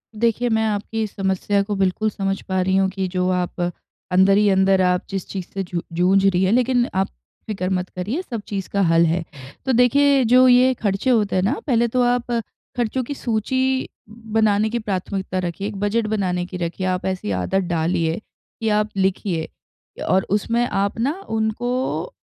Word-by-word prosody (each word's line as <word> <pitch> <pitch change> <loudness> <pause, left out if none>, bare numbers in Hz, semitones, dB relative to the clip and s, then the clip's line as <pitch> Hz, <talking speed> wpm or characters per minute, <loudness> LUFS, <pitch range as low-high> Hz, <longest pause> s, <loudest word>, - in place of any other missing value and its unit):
देखिए, 235 +2 +1
मैं 220 0 +2
आपकी 215 +1 -2
इस 210 - -6
समस्या 195 +1 0
को 205 +1 -3
बिल्कुल 195 +3 +1
समझ 195 -1 -2
पा 190 -1 -1
रही 190 +1 +1
हूँ 195 0 +3
कि 190 0 -3
जो 180 0 -1
आप 180 -1 -2 0.5
अंदर 190 +2 +5
ही 210 -1 +4
अंदर 190 0 +3
आप 180 -1 +2
जिस 195 -2 -4
चीज़ 190 -3 -5
से 195 - -2
जू 175 -1 -4
जूझ 185 +3 +3
रही 190 -1 +3
हैं, 190 - +2
लेकिन 250 0 +2
आप 190 +1 +1 0.4
फ़िक्र 190 -4 -2
मत 185 -1 -1
करिए 210 - -3
सब 235 - -6
चीज़ 195 -2 -4
का 200 - 0
हल 165 -2 +4
है। 165 +1 0 0.4
तो 265 - +1
देखिए 275 +3 +4
जो 255 +2 +6
ये 250 +1 +5
खर्चे 205 +1 -1
होते 215 -6 +2
हैं 185 - +2
ना, 205 +7 +2
पहले 235 -3 +3
तो 250 +2 0
आप 245 0 +1 0.5
खर्चों 245 +2 0
की 285 - -5
सूची 260 +2 0 0.2
बनाने 220 -1 +1
की 235 +2 -2
प्राथमिकता 190 -2 -3
रखिए, 180 +2 -3
एक 210 - -6
बजट 215 +2 0
बनाने 185 -4 -1
की 180 0 -7
रखिए, 175 +2 -3
आप 185 0 -1
ऐसी 185 - -2
आदत 190 - 0
डालिए 165 0 0 0.4
कि 225 - +1
आप 210 0 +1
लिखिए 190 -3 0 0.6
और 190 +1 +3
उसमें 230 +4 +1
आप 200 +1 -1
ना 265 +5 +1 0.2
उनको 245 - -1
200 Hz, 190 wpm, -21 LUFS, 185-230 Hz, 0.6 s, जो